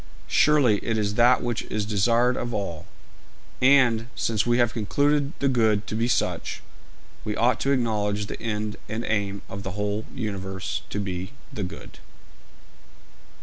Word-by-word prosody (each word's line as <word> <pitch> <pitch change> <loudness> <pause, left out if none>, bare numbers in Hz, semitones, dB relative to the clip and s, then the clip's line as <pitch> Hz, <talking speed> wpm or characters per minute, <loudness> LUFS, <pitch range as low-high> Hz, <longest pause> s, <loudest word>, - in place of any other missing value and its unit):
Surely 140 -8 +5
it 115 -1 -2
is 105 -1 0
that 120 +4 +4
which 120 -2 -1
is 105 -1 -1
desired 115 +5 +2
of 120 -2 -3
all; 85 -6 -4 0.7
and, 125 -4 +5
since 110 0 0
we 120 0 +3
have 120 -2 +2
concluded 145 +6 +1
the 140 - +1
good 110 -5 +2
to - - -6
be 115 +2 +1
such, - - -1 0.6
we 105 -1 -2
ought 120 +2 +2
to 135 - 0
acknowledge 105 -5 0
the - - -7
end 105 -1 -3
and 110 +2 -3
aim 100 -2 -1
of 100 - -6
the 95 -1 -5
whole 105 +1 -1
universe 95 -6 -4
to 100 - -3
be 95 +1 -4 0.2
"the 105 - -4
good."' 90 - -8
110 Hz, 155 wpm, -25 LUFS, 100-120 Hz, 0.7 s, Surely